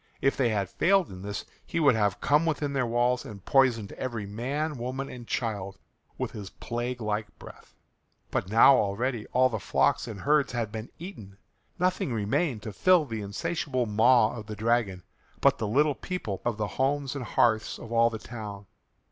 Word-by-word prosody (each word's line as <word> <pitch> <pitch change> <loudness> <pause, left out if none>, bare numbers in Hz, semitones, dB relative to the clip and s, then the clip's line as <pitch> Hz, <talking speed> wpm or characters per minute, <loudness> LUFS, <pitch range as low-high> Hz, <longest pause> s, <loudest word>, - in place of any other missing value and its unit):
If 135 - +2
they 125 -3 +2
had 100 -3 0
failed 190 - +2
in 90 -1 -9
this 100 +1 -5 0.2
he 170 - -3
would 145 -5 +5
have 105 -4 +1
come 150 +2 +3
within 145 -2 -1
their 130 -3 +1
walls 120 +1 +1
and 100 -3 -10
poisoned 125 -6 +3
every 115 -5 -4
man, 135 +8 -3
woman, 130 +3 -4
and 120 -2 -9
child 100 -5 -3 0.4
with - - -3
his 100 -3 -7
plague 120 +3 -4
like 105 0 -3
breath. - - -14 0.6
But 90 - -1
now 115 +5 +7
already 110 +3 -1
all 130 +1 +4
the 110 -4 -3
flocks 90 +5 +1
and 105 -4 -7
herds 145 -2 +2
had 115 -3 -2
been 110 +1 -6
eaten. 110 - -10 0.4
Nothing 180 -7 0
remained 110 +3 0
to 110 - -6
fill 180 - +4
the 115 -5 -4
insatiable 130 +4 -2
maw 115 +2 +4
of 110 -3 -8
the 105 - -5
dragon 110 -4 0 0.4
but - - +3
the 110 - -1
little 145 +7 +3
people 130 - -5
of 120 -3 -1
the 105 - -1
homes 135 +6 -1
and 140 - -4
hearths 110 -1 +1
of 115 - -10
all 115 0 +4
the 115 - -5
town. 105 -3 -8
120 Hz, 185 wpm, -28 LUFS, 105-135 Hz, 0.6 s, now